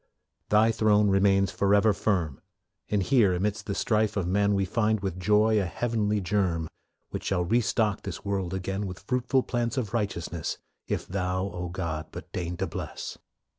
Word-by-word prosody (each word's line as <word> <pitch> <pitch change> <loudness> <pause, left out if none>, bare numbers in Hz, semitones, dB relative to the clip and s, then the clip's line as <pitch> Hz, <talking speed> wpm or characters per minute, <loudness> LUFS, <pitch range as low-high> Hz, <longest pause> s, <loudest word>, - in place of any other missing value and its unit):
Thy 110 +2 +5
throne 105 -2 +3
remains 95 0 +3
forever 100 +2 +3
firm, 90 -9 -1 0.5
And 105 -2 +1
here, 105 -7 +4
amidst 100 +3 -2
the 100 - -2
strife 110 -1 +1
of 95 - 0
men, 100 +3 +2
We 95 -1 +1
find 110 +2 +1
with 95 -2 -3
joy 105 +2 +3
a - - -1
heavenly 105 +3 0
germ 90 -4 0 0.4
Which - - -5
shall 90 -2 +1
re 115 +7 +3
stock 105 -2 0
this - - -7
world 95 -3 -1
again 95 +2 -3
With 90 -1 -6
fruitful 125 +1 +1
plants 120 +2 -2
of 115 -5 -2
righteousness, 85 -7 -2 0.3
If - - -2
Thou, 95 +1 -1
O 90 0 -4
God, 85 -3 -4
but - - -9
deign 90 -1 -3
to 95 - -1
bless. - - -6
100 Hz, 170 wpm, -27 LUFS, 90-105 Hz, 0.5 s, Thy